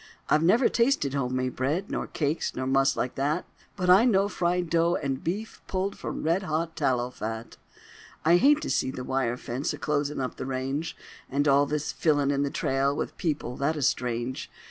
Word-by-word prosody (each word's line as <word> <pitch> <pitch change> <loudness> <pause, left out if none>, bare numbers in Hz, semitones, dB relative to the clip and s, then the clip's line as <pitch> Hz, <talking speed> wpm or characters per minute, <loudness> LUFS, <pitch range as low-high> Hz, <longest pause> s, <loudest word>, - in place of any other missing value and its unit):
I've 155 - +4
never 225 +10 +5
tasted 235 - +2
home 130 -2 0
bread, 150 +11 -2
Nor - - -2
cakes, 150 +1 -2
nor 130 - -2
muss 135 0 +2
like 125 - -1
that; 150 +6 -1 0.3
But 185 -3 -2
I 190 +5 +7
know 200 -5 +3
fried 175 -2 0
dough 170 +1 +2
and 135 -2 -2
beef 205 +6 -4
Pulled 190 +1 -2
from - - -5
red 165 +4 +2
hot 165 -2 -2
tallow 125 -5 0
fat. 110 -1 -6 0.7
I 170 +2 +6
hate 295 - +5
to - - -3
see - - +1
the 130 -1 -5
wire 125 -2 -1
fence 125 +3 -3
A - - -6
closin' 150 -1 -1
up 130 -1 -3
the - - -5
range; 135 +5 -3 0.3
And 145 +2 +1
all 140 +1 +4
this 150 0 -2
fillin' 145 -3 +2
in 140 0 +1
the 140 - 0
trail 135 +1 0
With - - -3
people 150 -7 -2
that 150 +3 0
is 145 -5 +2
strange. 120 +1 -2
145 Hz, 195 wpm, -27 LUFS, 130-170 Hz, 0.7 s, I